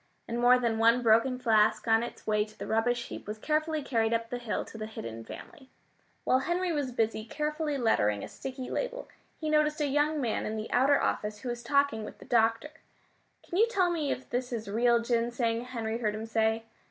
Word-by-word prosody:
And 235 +1 -3
more 245 +1 +6
than 230 -3 0
one 230 +2 +4
broken 230 +3 +4
flask 215 -2 +3
on 225 0 +4
its 240 - -7
way 210 -1 +2
to 215 0 -14
the - - -6
rubbish 235 +2 0
heap - - -8
was 210 +1 -4
carefully 310 +4 -1
carried 225 -3 +1
up 230 0 -3
the 245 - -3
hill 235 -3 -3
to - - -13
the 215 -1 -5
hidden 115 - -7
family. 265 - -11 0.5
While 255 - +3
Henry 345 +5 -1
was 290 -5 -1
busy 225 -2 0
carefully 300 +4 -2
lettering 105 - +1
a - - -5
sticky 260 -1 -7
label, - - -3 0.3
he 315 - -3
noticed 305 0 +2
a 300 - +1
young 295 +2 +1
man 240 -5 -1
in 220 +1 -3
the 215 +1 -5
outer 275 +3 +4
office 210 0 -2
who 250 - -4
was 240 0 -4
talking 280 -3 +1
with - - -9
the - - -13
doctor. 230 +5 +2 0.8
"Can 350 - -2
you 450 - +6
tell 375 -7 +2
me 310 -5 -1
if 255 - -4
this 250 0 -3
is 225 -3 -4
real 235 +3 +3
ginseng?" 235 0 0
Henry 230 -2 -3
heard 215 -3 -1
him 220 +1 -5
say. 225 0 +1
240 Hz, 215 wpm, -29 LUFS, 225-280 Hz, 0.8 s, more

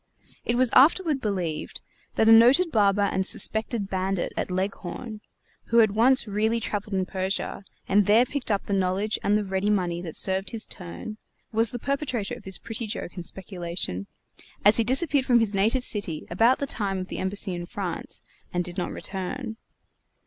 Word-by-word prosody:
It 235 - +1
was 250 -1 +4
afterward 305 +1 +4
believed 180 -8 -3 0.3
that 220 - +3
a - - +8
noted 255 +10 +6
barber 205 -2 +3
and 190 -1 0
suspected 220 +2 0
bandit 190 -1 -2
at - - -2
Leghorn, 195 +4 -4 0.4
who 230 - +1
had 220 -3 +6
once 255 +5 +4
really 220 +2 0
traveled 205 -2 -3
in 190 -1 0
Persia, 190 +1 -2 0.2
and 200 0 +3
there 220 +4 +5
picked 280 -2 -4
up 205 -2 +1
the 200 - -4
knowledge 195 +3 0
and 205 +1 +2
the 210 - -1
ready 190 +1 -1
money 175 -4 0
that 165 -3 -7
served 190 0 +1
his 225 -1 -1
turn, 200 +3 -8 0.3
was 225 0 +2
the 245 - -4
perpetrator 260 -4 -2
of - - -8
this 190 -1 -2
pretty 225 0 -4
joke 210 -4 -5
and 175 -2 -6
speculation, 170 - -4 0.6
as 210 +1 +7
he 230 - +3
disappeared 270 +2 +1
from 245 -2 +5
his 220 -2 +1
native 220 +6 +2
city 180 -7 -2
about 230 +8 +4
the 280 - -2
time 200 -7 -2
of 185 0 -4
the - - -5
embassy 190 0 -1
in 175 0 -5
France, 175 - -4 0.3
and 175 0 -1
did 175 +1 -5
not 180 - -3
return. 220 +5 -4
205 Hz, 185 wpm, -25 LUFS, 190-230 Hz, 0.6 s, a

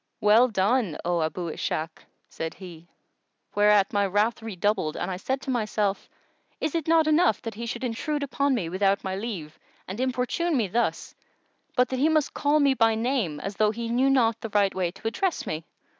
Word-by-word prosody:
"Well 215 +4 +5
done, 210 -4 +1
O 175 -1 +1
Abu 165 +2 -2
Ishak!"[FN#120] 160 +1 -4 0.2
said 160 0 -5
he; 170 -3 -11 0.7
whereat 205 -1 +4
my 200 -1 +2
wrath 210 +5 +1
redoubled 205 -6 -1
and 190 - -3
I 180 - -3
said 260 +8 -2
to 265 - -3
myself, 210 -4 -1 0.5
"Is 310 - -2
it 330 -2 -2
not 325 -1 +4
enough 310 - +3
that 225 - -4
he 235 +3 -6
should 235 +2 -5
intrude 285 +5 -2
upon 280 0 0
me, 190 -9 -2
without 195 +3 +1
my 190 0 -3
leave, 190 -8 -6 0.3
and 190 +5 -6
importune 260 +6 0
me 225 -5 +1
thus, 235 +6 -1 0.6
but 250 0 +2
he 265 +4 +2
must 310 -3 +1
call 295 +1 +2
me 280 -2 +4
by 225 -3 +3
name, 225 - -1
as 195 0 -5
though 215 -1 +4
he 230 +2 -4
knew 255 +3 +2
not 230 -4 +2
the 225 - -5
right 205 -1 +2
way 185 -2 -1
to 195 +5 -7
address 345 +11 -1
me?" 155 +1 -4
220 Hz, 190 wpm, -26 LUFS, 190-260 Hz, 0.7 s, Well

